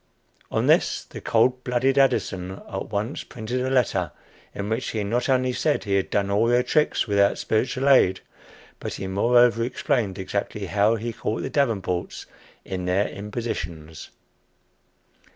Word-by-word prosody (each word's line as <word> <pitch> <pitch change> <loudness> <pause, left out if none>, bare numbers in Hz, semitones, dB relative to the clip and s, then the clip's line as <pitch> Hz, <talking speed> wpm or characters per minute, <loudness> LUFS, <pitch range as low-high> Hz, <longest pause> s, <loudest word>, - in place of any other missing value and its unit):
On - - 0
this - - +3
the - - -10
cold 125 +3 +2
blooded 125 +2 +1
Addison 95 -9 +1
at 95 - -5
once 105 +7 -3
printed 120 +1 -4
a 130 - -1
letter, 100 - +1 0.4
in 100 - -4
which 110 +3 -2
he 110 -2 -2
not 120 +8 -1
only 130 -1 +2
said 150 +3 0
he 100 - -2
had 95 - 0
done 100 -1 0
all 105 +3 +3
their 120 +1 +3
tricks 150 +4 +1
without 100 -2 +2
spiritual 130 +4 0
aid, 95 -9 +5 0.6
but - - -5
he - - -5
moreover 115 +4 +3
explained 120 -4 -1
exactly 100 +1 -3
how 100 +4 +2
he 115 +1 -4
caught 115 -1 -3
the 130 - -4
Davenports 100 - -1 0.4
in 90 -1 -4
their 95 +3 +1
impositions. 90 - -6
110 Hz, 150 wpm, -24 LUFS, 100-125 Hz, 0.6 s, aid